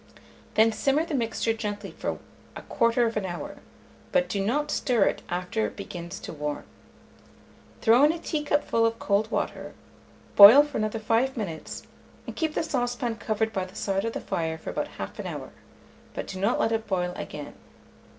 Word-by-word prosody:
Then 220 +1 +5
simmer 275 +8 +1
the 335 - -6
mixture 230 -3 0
gently 205 -3 -5
for - - -4 0.4
1/4 230 -2 +1
hour, 175 -2 -5 0.5
but 270 -1 +2
do 200 -1 -1
not 295 +8 0
stir 240 -6 +2
it - - 0
after 185 +5 -1
it - - -10
begins 175 -2 -7
to - - -7
warm. 150 -1 -4 1.2
Throw 235 +4 +5
in 300 - +5
a 335 - -4
teacupful 295 -7 0
of 230 0 +2
cold 210 0 +1
water, - - -3 0.6
boil 220 +8 +11
for 295 -4 -4
another 215 +1 -1
5 230 +4 +1
minutes, 170 -8 -5 0.4
and - - -7
keep 315 -2 -1
the - - +1
saucepan 245 -5 -2
covered 220 0 -1
by 190 - -1
the 185 0 -10
side 195 -1 -1
of 230 0 -2
the - - -3
fire 160 -1 -2
for - - -6
about - - -2
1/2 - - -6
hour, - - -6 0.6
but - - -3
do 185 - -7
not 205 +5 +1
let 225 - +2
it 225 -1 -1
boil 180 -3 -1
again. 145 -1 -7
225 Hz, 170 wpm, -26 LUFS, 195-245 Hz, 1.2 s, boil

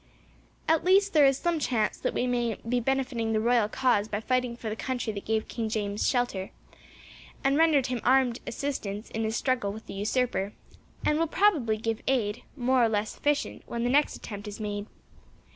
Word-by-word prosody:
At 320 0 +3
least 390 +2 +4
there 295 -3 +7
is 270 -1 +2
some 345 0 0
chance 235 -6 0
that - - -2
we 245 - +1
may 240 -3 0
be 245 +1 +1
benefiting 250 -3 -1
the 215 - +2
royal 230 -1 +2
cause 215 -4 +2
by 205 - -2
fighting 250 +1 -1
for 230 - -7
the 215 - -2
country 245 -2 -3
that 200 - -7
gave 220 0 0
King 225 -2 -3
James 205 -1 -1
shelter, 245 -7 -1 0.9
and 270 +1 +3
rendered 305 -4 +4
him 250 -3 -2
armed 255 -2 +3
assistance 220 -7 -4
in 225 - -2
his 220 0 -1
struggle 245 -7 0
with 220 +2 -9
the - - -8
usurper, 210 0 -1 0.5
and 300 +1 +2
will 330 - +2
probably 310 - +2
give 225 0 -2
aid, 230 -5 0 0.2
more 255 0 +3
or 230 - +4
less 210 0 -1
efficient, 290 0 -1
when 235 0 -3
the 245 - +1
next 290 +2 +3
attempt 205 -1 -8
is 205 +1 -7
made. 205 -1 -4
240 Hz, 195 wpm, -28 LUFS, 215-270 Hz, 0.9 s, there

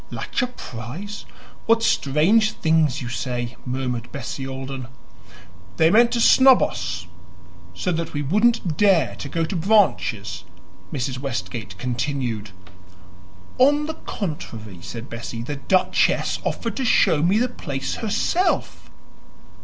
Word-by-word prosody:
"LACHER 250 - -2
PRISE? 180 - -8 0.4
What 230 0 +4
strange 205 +8 +3
things 155 -5 +1
you - - -5
say!" 120 -1 -3
murmured 125 -2 -3
Bessie 135 0 -5
Alden. 135 -1 -6 0.9
"They 160 +1 +5
meant 235 +3 +5
to 240 - +1
snub 260 +2 +7
us, 85 0 -3 0.7
so 180 - -1
that 165 -1 -2
we 145 -1 -2
shouldn't 210 - +2
dare 185 -10 +3
to 140 - -6
go 165 +3 0
to 185 - -4
Branches," 140 - +1 0.5
Mrs. 130 -1 -3
Westgate 120 -7 -5
continued. 120 -3 -2 1.1
"On 290 +3 +4
the 320 - -3
contrary," 115 - -6
said 115 +5 -7
Bessie, 115 0 -6
"the 145 +4 -4
duchess 185 +7 +2
offered 230 - -3
to 270 - -1
show 160 - +4
me 180 +6 +3
the 245 +3 +2
place 145 - -4
herself." 230 - 0
145 Hz, 125 wpm, -23 LUFS, -, 1.1 s, snub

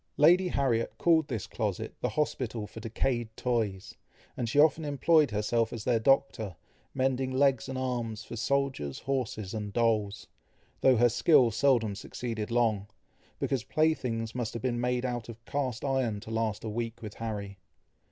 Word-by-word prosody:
Lady 175 +5 +6
Harriet 130 -8 0
called 160 -3 +3
this 115 -7 -3
closet - - -3
the - - 0
hospital 125 -7 -2
for 105 +2 -10
decayed 115 +1 -1
toys, 110 -6 -1 0.4
and 120 -2 -2
she 130 - -2
often 155 +1 +5
employed 150 +1 +3
herself 110 +2 0
as 115 -3 -5
their 120 -1 +2
doctor, 110 -6 +2 0.4
mending 130 0 +1
legs 135 -2 +2
and 130 - -4
arms 120 -4 -3
for 115 - -8
soldiers, 130 - -1
horses, 115 -7 -2
and 105 -2 -4
dolls, 110 -2 +1 0.5
though 130 -1 +5
her 120 +2 +6
skill 130 0 +4
seldom 115 -3 +2
succeeded 110 +1 -5
long, 115 -4 +1 0.5
because 130 -5 -1
play 155 +4 +2
things 115 -5 -4
must 120 -3 -3
have 115 - -5
been 120 -2 0
made 125 +1 0
of 115 -2 -5
cast 135 -3 -2
iron 130 -6 0
to 110 +1 -9
last 110 -2 -1
a - - -4
week 115 +1 -4
with 105 -1 -6
Harry. 100 -3 -5
120 Hz, 160 wpm, -29 LUFS, 110-135 Hz, 0.5 s, Lady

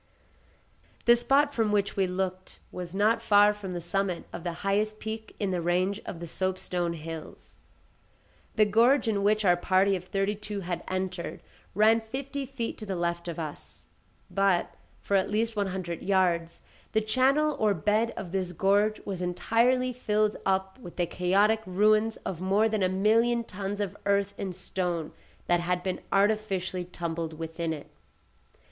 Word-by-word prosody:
The 235 - +7
spot 280 +4 +3
from 225 -4 +1
which 200 -1 +1
we 195 -1 +2
looked 185 0 -4
was 180 0 -6
not 220 +3 +3
far 205 -1 +5
from 200 -3 -7
the 175 - -3
summit 180 +1 -1
of 170 - -6
the 175 - -2
highest 215 +2 +1
peak 220 0 -6
in 200 -2 0
the 180 -2 -1
range 185 +4 0
of 170 - -5
the 170 - -5
soapstone 180 -1 -2
hills. 160 -1 -9 0.9
The 215 - +5
gorge 235 +5 +4
in 205 -3 +1
which 210 +1 +2
our 175 -1 +6
party 190 +2 +2
of 180 -1 -6
thirty 195 +2 0
two 210 -1 -6
had 175 -1 -4
entered 185 -1 -4 0.3
ran 215 +2 +5
within 220 -1 -16
fifty 275 +2 -4
feet 245 -3 -4
to 215 - -6
the 195 - -2
left 170 0 -2
of 170 - -4
us. 155 -3 -8 0.5
But, 195 -3 +2 0.3
for 200 - 0
at 190 - +2
least 225 +2 0
one 205 -1 0
hundred 180 -3 -4
yards, 175 -4 +1 0.3
the 220 - +3
channel 270 +7 +2
or 210 -2 +3
bed 210 +7 +1
of 180 -3 -6
this 185 -2 -2
gorge 205 +4 +2
was 190 -3 -4
entirely 235 +8 +1
filled 215 -3 +1
up 190 +2 0
with 175 -9 -10
the 175 - +1
chaotic 200 +6 +2
ruins 215 +4 +3
of 175 -2 -4
more 200 +4 +3
than 215 -2 -1
a 185 - +3
million 225 +5 +3
tons 200 -1 -5
of 200 -3 -2
earth 200 0 +2
and 190 -2 -4
stone 175 -3 -3 0.3
that 175 0 +3
had 180 +1 -1
been 185 -1 -2
artificially 195 -3 +1
tumbled 170 -2 -4
within 165 +1 -4
it. 150 -3 -7
195 Hz, 170 wpm, -28 LUFS, 180-215 Hz, 0.9 s, The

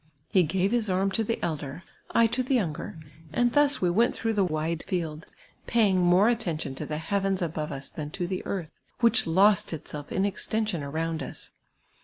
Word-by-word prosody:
Jle 180 -4 +5
^ive 190 +4 +1
his 235 -3 +1
arm 190 +1 +1
to 225 - +1
the 230 +2 -1
elder, 150 0 -4 0.3
I 230 - +4
to 240 +3 +1
the 260 +1 +1
youni^er, 165 -5 -3 0.3
and 240 +4 +2
thus 290 -6 +3
we 175 - +3
went 230 +7 +3
through 225 -1 -1
the 205 -2 +2
wide 160 -1 -1
field, 165 -5 -3 0.4
])iiying 215 -5 +3
more 180 +3 +5
attention 175 - -1
to 145 +2 -6
the 150 - -3
heavens 195 +3 0
above 155 -3 -3
us 135 -1 -5
than 150 -3 -6
to 175 +3 -3
the 185 +1 -3
earth, 175 -6 -4 0.3
which 235 -1 +4
lost 190 +3 +4
itself 150 -1 -7
in 190 - +1
extension 205 -2 -1
around 160 +3 -2
us. - - -5
185 Hz, 190 wpm, -27 LUFS, 160-215 Hz, 0.4 s, Jle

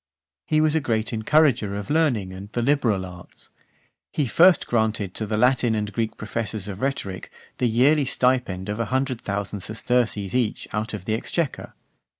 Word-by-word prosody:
XVIII. - - +1
He - - +5
was 155 -1 +3
a 160 - +3
great 115 -6 -1
encourager 115 -3 +2
of 100 +3 -5
learning 125 -13 +1
and 100 +2 -9
the 120 - 0
liberal 120 -8 +1
arts. 90 -1 -13 0.6
He 150 - 0
first 170 +8 +5
granted 110 -4 0
to 110 - -3
the 105 0 -1
Latin 120 -1 +3
and 105 -1 -3
Greek 115 -1 -2
professors 110 -2 -4
of 100 0 -6
rhetoric 115 -9 -3 0.3
the 125 - +2
yearly 135 +6 +4
stipend 125 -8 +1
of 105 +2 -3
a 115 - 0
hundred 130 0 -1
thousand 100 0 -3
sesterces 110 -1 -1
each 125 -4 -1
out 110 +1 -2
of 95 -3 -8
the 110 - -1
exchequer. 140 +6 -2
110 Hz, 175 wpm, -24 LUFS, 105-130 Hz, 0.6 s, He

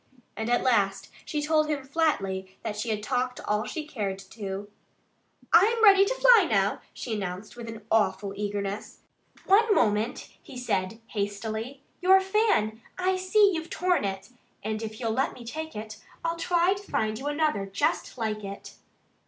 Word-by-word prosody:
And 220 +1 -3
at 245 - +2
last 200 -6 +1
she 300 -1 -2
told 310 0 +2
him 290 -3 -1
flatly 195 - -1
that 215 -2 -3
she 215 +3 -3
had 210 -1 -2
talked 250 +1 -1
all 210 +1 -1
she 310 -2 -5
cared 205 -9 -3
to. 200 -2 -5 0.9
"I'm 450 +5 +5
ready 395 -2 +8
to - - -1
fly 485 -7 +6
now," 200 -1 +1
she 235 - -5
announced 195 +1 -5
with 235 -1 -8
an 225 -2 -9
awful 210 -2 +1
eagerness. 205 0 -4 0.4
"One 420 +2 +5
moment!" 215 +4 +1
he 260 - -11
said 210 -3 -2
hastily. 220 +5 -4 0.2
"Your 380 +1 +7
fan 380 - +1 0.2
I 370 +1 +1
see 395 +2 +4
you've 325 0 -4
torn 360 -5 +1
it! 195 +1 -4 0.3
And 215 +1 -2
if 220 -1 -6
you'll 230 -3 -1
let 260 +4 0
me 240 - -11
take 315 +5 -6
it 215 0 -7 0.3
I'll 330 0 0
try 345 +2 +2
to 400 - -8
find 215 0 0
you 280 - -5
another 295 -10 0
just 285 - -1
like 215 -2 -2
it." 200 0 -8
230 Hz, 170 wpm, -27 LUFS, 210-325 Hz, 0.9 s, ready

